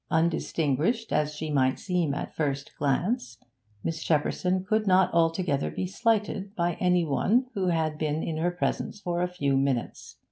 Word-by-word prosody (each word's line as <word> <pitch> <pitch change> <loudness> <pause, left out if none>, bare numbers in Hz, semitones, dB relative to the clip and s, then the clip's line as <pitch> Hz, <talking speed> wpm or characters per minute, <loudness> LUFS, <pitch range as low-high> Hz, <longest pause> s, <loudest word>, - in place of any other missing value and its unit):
Undistinguished 165 - 0
as 150 0 +1
she 155 0 -4
might 130 -2 +2
seem 175 -7 -1
at - - -4
the - - -28
first 140 -3 -2
glance, 140 - 0 0.5
Miss 160 -1 -3
Shepperson 180 +4 0
could 215 +2 +1
not 185 0 +4
altogether 165 -3 +1
be - - -3
slighted 210 0 -1
by 175 -2 +1
any 180 -2 +3
one 210 - +2
who 195 -4 -1
had 160 -3 0
been 155 0 -1
in 160 - -3
her 170 +2 +1
presence 175 +3 -2
for 175 -3 -2
a 180 - +2
few 145 -7 0
minutes. 135 -3 -1
170 Hz, 170 wpm, -27 LUFS, 150-185 Hz, 0.5 s, not